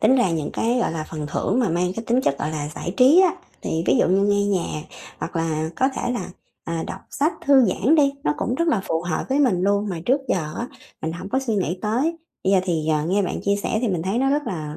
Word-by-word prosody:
Tính 260 - +5
ra 220 -8 +3
những 160 -3 -2
cái 235 +2 +1
gọi 235 - 0
là 160 -2 -3
phần 155 -2 -4
thưởng 185 - -1
mà 235 - +2
mang 180 +2 0
cái 225 - -4
tính 240 +3 +2
chất 140 - 0
gọi 150 - -2
là 150 -2 -3
giải 175 - -5
trí 275 +8 +7
á 370 -3 +4 0.3
thì 160 - -1
ví - - +4
dụ - - +3
như 190 +2 +3
nghe 205 0 +2
nhạc, 180 -6 -1 0.4
hoặc 170 - -5
là 160 -1 -1
có 260 - +3
thể 245 - -1
là, 240 - -4 0.3
à, 165 0 -3
đọc - - -6
sách 300 +4 +1
thư 275 -2 +6
giãn 230 - +2
đi, 280 -3 +4
nó 150 - +2
cũng 245 - -1
rất 335 +5 0
là 260 -11 +2
phù 165 0 -1
hợp 175 - -2
với 270 +2 +1
mình 230 -11 +3
luôn, 200 +1 +1
mà 175 -4 -4
trước 265 +3 +3
giờ 155 -4 -1
á 240 - -2 0.4
mình 160 +1 -2
hổng 180 +3 -7
có 260 - +1
suy 260 -5 -1
nghĩ 185 -3 -1
tới. 255 +11 0 0.3
Bây 190 - +3
giờ 190 - +5
thì, 160 -4 -1
ờ, 155 -1 +1
nghe 195 +4 +2
bạn 185 - -3
chia 200 0 +2
sẻ 215 +2 -1
thì 240 - +1
mình 180 -5 -1
thấy 195 +6 -1
nó 270 +1 +2
rất 295 +1 +1
là 155 -4 -4
195 Hz, 275 wpm, -23 LUFS, 165-250 Hz, 0.4 s, trí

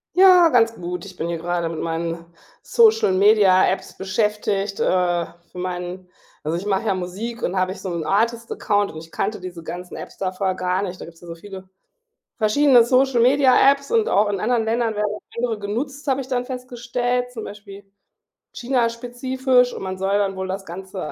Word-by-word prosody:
Ja, 365 -2 +7
ganz 230 -4 +3
gut. 180 -1 -6
Ich 190 -2 -11
bin 170 0 -4
hier 170 - -2
grade 170 0 -2
mit 165 - -5
meinen 165 0 -3 0.4
Social 450 - +4
Media-Apps 190 -2 +3
beschäftigt, 200 0 -1
äh, 175 -2 +1 0.3
für - - -13
meinen 180 0 -5 0.3
Also, 160 +2 -1
ich 185 - -6
mache 205 +1 0
ja 200 - +3
Musik 205 +6 -5
und 180 - -1
habe 185 0 +1
ich - - -8
so 190 - -4
'nen 170 -2 -3
Artist-Account 215 0 0
und - - -10
ich 160 +1 -11
kannte 210 +1 -2
diese 180 -2 -8
ganzen 180 +2 -7
Apps - - -9
da 185 -1 -2
vorher 185 0 -1
gar 185 +1 -1
nicht. 185 -2 -5
Da - - -7
gibt's 165 0 -15
ja 175 - -13
so 170 - -7
viele 190 +1 -11 0.7
verschiedene 245 +3 +5
Social 255 0 +3
Media-Apps, 275 +2 +4
und 455 -1 +3
auch 205 +1 +3
in 200 -2 -2
anderen 235 +2 +1
Ländern 230 0 0
werden 210 0 -1 0.2
andere 235 -2 -1
genutzt, 260 +8 -4
habe 270 0 +1
ich 260 - -9
dann 250 -2 -1
festgestellt, 245 -1 -3
zum 225 -3 -6
Beispiel 205 -1 -10 0.7
China 245 -1 0
spezifisch. 250 +1 0
Und - - -7
man 190 0 -4
soll 195 +2 +1
dann 195 -1 -1
wohl 190 0 -3
das 195 +1 -5
Ganze 190 +3 -8
205 Hz, 190 wpm, -22 LUFS, 185-245 Hz, 0.7 s, Ja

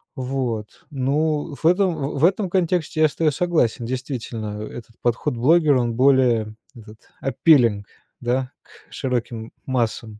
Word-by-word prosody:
Вот, 125 -5 -4
ну, 145 +2 -1
в 160 - -10
этом, 180 0 +3
в 140 0 -4
в - - +6
этом 195 +1 +1
контексте 175 -3 0
я 155 - +7
с 145 - -10
тобой 155 -2 +2
согласен. 150 -8 0
Действительно, 115 -4 -5
этот 115 +1 -10
подход 120 0 0
блогера, 150 +1 +4
он 120 -1 -1
более 125 -4 +3 0.2
вот 115 - -12
этот 110 0 -14 0.2
appealing, 120 -6 +3 0.4
да, 125 +2 -1
к - - -22
широким 120 -5 -3
массам. 115 -4 -2
130 Hz, 145 wpm, -22 LUFS, 115-155 Hz, 0.4 s, я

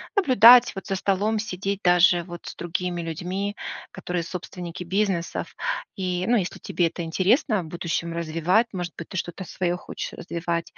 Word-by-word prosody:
наблюдать 250 - +7
вот 195 - -6
за 195 - -1
столом, 200 +3 +1
сидеть 200 -2 -3
даже 175 0 +5
вот 175 -1 -10
с - - -7
другими 175 +1 -3
людьми, 180 +5 -3 0.4
которые 180 -1 -3
собственники 175 0 -6
бизнесов, 190 -2 -1 0.4
и, 180 -1 -1
ну, 240 - +5
если 190 -4 -2
тебе 175 - 0
это 170 +1 -5
интересно, 195 - +2
в - - -9
будущем 170 0 -3
развивать. 170 +7 +1
Может 175 -2 -4
быть, 170 - -8
ты 190 - -5
что-то 175 +2 -4
свое 175 -1 -1
хочешь - - -6
развивать. 170 0 -3
180 Hz, 160 wpm, -25 LUFS, 170-195 Hz, 0.4 s, наблюдать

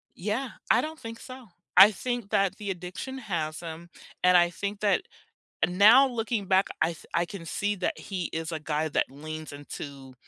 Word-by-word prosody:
Yeah, 215 +8 -2 0.2
I 230 - +5
don't 315 +3 -6
think 230 0 -8
so. 255 -2 -10 0.3
I 210 - +10
think 240 0 -4
that 195 -1 +2
the 205 -1 -5
addiction 185 +8 -5
has 170 -10 -3
him. 170 0 -8 0.3
And 180 0 +7
I 175 0 +5
think 200 +3 -5
that 205 -1 +2 0.6
now 215 +9 +7
looking 230 -4 -2
back, 190 +1 +3
I 165 +1 +2 0.2
I 170 - +2
can 180 -2 -9
see 205 +5 -1
that 180 - -2
he 185 -3 -4
is 160 +1 -3
a 160 - -3
guy 155 0 -1
that - - +1
leans 155 +3 -7
into, 140 -2 -9
190 Hz, 180 wpm, -27 LUFS, 160-220 Hz, 0.6 s, I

